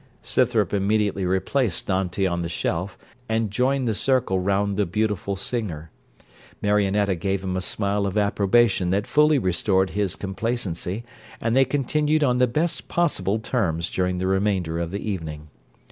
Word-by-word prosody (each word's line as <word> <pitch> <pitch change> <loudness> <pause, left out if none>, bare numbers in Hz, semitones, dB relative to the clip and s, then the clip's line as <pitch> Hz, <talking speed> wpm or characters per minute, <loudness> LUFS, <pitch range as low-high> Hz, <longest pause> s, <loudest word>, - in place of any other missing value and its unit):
Scythrop - - +1
immediately 100 -1 +1
replaced 95 - 0
Dante 95 0 0
on 85 -2 -1
the 85 - -3
shelf, 90 +2 -2 0.3
and 110 -2 0
joined 130 +4 +1
the 110 - +1
circle 125 -4 +2
round 100 +2 0
the 100 -1 0
beautiful 105 0 -1
singer. 95 -7 -4 0.7
Marionetta 100 -1 +2
gave 95 +2 -2
him 95 -1 -2
a 95 - -1
smile 100 +1 -1
of 100 +2 -3
approbation 100 -1 +2
that 100 +3 +1
fully 150 0 +4
restored 95 -2 +1
his 100 -3 0
complacency, 100 -1 -3 0.4
and 115 +1 0
they 135 0 +5
continued 150 +3 +1
on 125 -3 +2
the 125 - +4
best 155 +7 -1
possible 105 - +1
terms 90 -8 -1
during 90 0 0
the 95 - -2
remainder 95 -4 0
of 85 -1 -2
the 100 +4 -5
evening. 80 -6 -5
100 Hz, 155 wpm, -24 LUFS, 95-115 Hz, 0.7 s, they